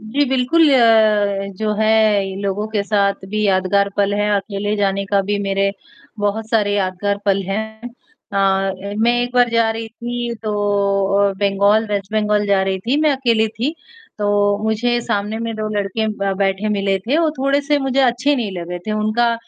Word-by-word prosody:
जी, 240 Hz, +7 st, 0 dB
बिल्कुल 265 Hz, +5 st, +3 dB
अ, 215 Hz, -4 st, +3 dB
जो 215 Hz, +1 st, -1 dB
है 220 Hz, 0 st, +3 dB, 0.4 s
इ -, -, -7 dB
लोगों 200 Hz, +1 st, -2 dB
के 215 Hz, -2 st, -1 dB
साथ 200 Hz, -2 st, 0 dB
भी 215 Hz, +1 st, -2 dB
यादगार 195 Hz, +1 st, +2 dB
पल 200 Hz, 0 st, +1 dB
हैं, 210 Hz, 0 st, 0 dB
अकेले 205 Hz, +1 st, -2 dB
जाने 200 Hz, -1 st, 0 dB
का 200 Hz, 0 st, +2 dB
भी 205 Hz, +1 st, -2 dB
मेरे 195 Hz, 0 st, 0 dB, 0.5 s
बहुत 205 Hz, +2 st, -2 dB
सारे 210 Hz, -3 st, +2 dB
यादगार 200 Hz, +1 st, -1 dB
पल 195 Hz, -1 st, +1 dB
हैं 220 Hz, +4 st, -5 dB, 0.4 s
अ, 195 Hz, -1 st, +1 dB
ए 200 Hz, 0 st, -5 dB
मैं 230 Hz, +2 st, +3 dB
एक 245 Hz, +1 st, -5 dB
बार 245 Hz, -1 st, +4 dB
जा 230 Hz, -1 st, +2 dB
रही 225 Hz, 0 st, -5 dB
थी 240 Hz, +1 st, -5 dB
तो 215 Hz, -1 st, -2 dB, 0.8 s
अ, -, -, -4 dB
बंगाल 200 Hz, +2 st, +2 dB
वेस्ट 200 Hz, -1 st, -3 dB
बंगाल 210 Hz, -1 st, +1 dB
जा 200 Hz, -1 st, +2 dB
रही 190 Hz, 0 st, -1 dB
थी, 235 Hz, +9 st, -1 dB
मैं 310 Hz, -1 st, +3 dB
अकेली 230 Hz, -4 st, +1 dB
थी। 235 Hz, +8 st, -3 dB, 0.4 s
तो 205 Hz, -, -1 dB, 0.4 s
मुझे 240 Hz, +2 st, 0 dB
सामने 210 Hz, -1 st, -2 dB
में 230 Hz, -1 st, -3 dB
2 215 Hz, 0 st, -3 dB
लड़के 205 Hz, +2 st, -1 dB
ब 200 Hz, 0 st, 0 dB
बैठे 195 Hz, +1 st, 0 dB
मिले 195 Hz, -2 st, 0 dB
थे, 235 Hz, +10 st, -1 dB
वो 330 Hz, -2 st, +2 dB
थोड़े 275 Hz, +2 st, +1 dB
से 290 Hz, +1 st, +1 dB
मुझे 270 Hz, -1 st, 0 dB
अच्छे 255 Hz, +3 st, +2 dB
नहीं 230 Hz, -5 st, -2 dB
लगे 175 Hz, +1 st, -5 dB
थे, 215 Hz, -, -1 dB
उनका 215 Hz, +3 st, +1 dB
210 Hz, 190 wpm, -18 LUFS, 200-230 Hz, 0.8 s, बार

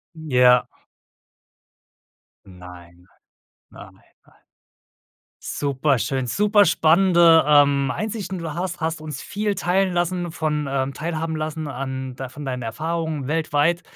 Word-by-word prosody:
Ja. 125 Hz, -6 st, +3 dB, 1.8 s
Nein. 90 Hz, -1 st, -14 dB, 0.6 s
Nein, -, -, -12 dB
nein. -, -, -25 dB, 1.4 s
Superschön, 135 Hz, -2 st, -1 dB
super 205 Hz, -, +3 dB
spannende, 170 Hz, -2 st, +4 dB
ähm, 140 Hz, -2 st, +4 dB
Einsichten. 205 Hz, -4 st, -4 dB
Du 165 Hz, -3 st, -5 dB
hast 180 Hz, 0 st, -4 dB
hast 160 Hz, 0 st, -2 dB
uns 150 Hz, -4 st, -6 dB
viel 210 Hz, 0 st, -2 dB
teilen 185 Hz, +1 st, 0 dB
lassen 175 Hz, -1 st, -2 dB
von 150 Hz, -3 st, -2 dB, 0.3 s
teilhaben 160 Hz, 0 st, -3 dB
lassen 155 Hz, 0 st, -4 dB
an 130 Hz, -1 st, -5 dB
d 130 Hz, 0 st, -6 dB
von 145 Hz, +3 st, -10 dB
deinen 125 Hz, -1 st, -4 dB
Erfahrungen 155 Hz, +4 st, -3 dB
weltweit. 160 Hz, +2 st, +1 dB
155 Hz, 105 wpm, -22 LUFS, 130-175 Hz, 1.8 s, spannende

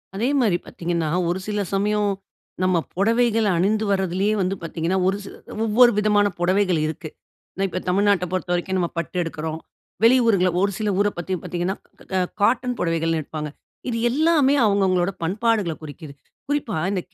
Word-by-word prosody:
அதே 230 Hz, +6 st, 0 dB
மாரி 205 Hz, -7 st, +2 dB
பாத்தீங்கன்னா. 170 Hz, -2 st, -2 dB, 0.2 s
ஒரு 180 Hz, +2 st, -1 dB
சில 210 Hz, -1 st, -1 dB
சமயம் 205 Hz, +1 st, +1 dB, 0.5 s
நம்ம 185 Hz, -1 st, +3 dB, 0.2 s
பொடவைகள 225 Hz, +3 st, +2 dB
அணிந்து 210 Hz, +5 st, +1 dB
வருதுலயே 190 Hz, +2 st, +1 dB
வந்து 185 Hz, +1 st, 0 dB
பாத்தீங்கன்னா, 165 Hz, +2 st, -1 dB
ஒரு 195 Hz, +1 st, +1 dB
சில. 195 Hz, -, -10 dB, 0.3 s
ஒவ்வொரு 240 Hz, +3 st, +6 dB
விதமான 210 Hz, -1 st, +3 dB
பொடவைகள் 185 Hz, -1 st, +2 dB
இருக்கு. 160 Hz, +1 st, -6 dB, 0.5 s
நான் 195 Hz, 0 st, +1 dB
இப்ப 185 Hz, -, -3 dB
தமிழ்நாட்ட 200 Hz, -1 st, +2 dB
பொறுத்த 185 Hz, -1 st, -2 dB
வரைக்கும் 180 Hz, +2 st, -1 dB
நம்ம 175 Hz, -1 st, 0 dB
பட்டு 170 Hz, +2 st, -3 dB
எடுக்கிறோம். 160 Hz, -1 st, -5 dB, 0.4 s
வெளியூர்கள்ல 230 Hz, -6 st, +5 dB
ஒரு, 200 Hz, +2 st, +2 dB
சில 215 Hz, -1 st, -1 dB
ஊர 205 Hz, -, +3 dB
பத்தி 175 Hz, +2 st, -3 dB
பாத்தீங்கன்னா, 180 Hz, +1 st, -2 dB, 0.4 s
அ -, -, +3 dB, 0.2 s
காட்டன் 245 Hz, +3 st, +2 dB
புடவைகள்ன்னு 165 Hz, -1 st, 0 dB
எடுப்பாங்க. 150 Hz, 0 st, -6 dB, 0.4 s
இது 230 Hz, -, -1 dB
எல்லாமே 295 Hz, 0 st, +3 dB
அவங்க 200 Hz, -1 st, +2 dB
அவங்களோடா 185 Hz, +1 st, +1 dB
பண்பாடுகள்ல 205 Hz, -1 st, 0 dB
குறிக்குது. 145 Hz, 0 st, -9 dB, 0.3 s
குறிப்பா 285 Hz, -, -1 dB
இந்த 190 Hz, -3 st, -1 dB
195 Hz, 155 wpm, -22 LUFS, 175-215 Hz, 0.5 s, ஒவ்வொரு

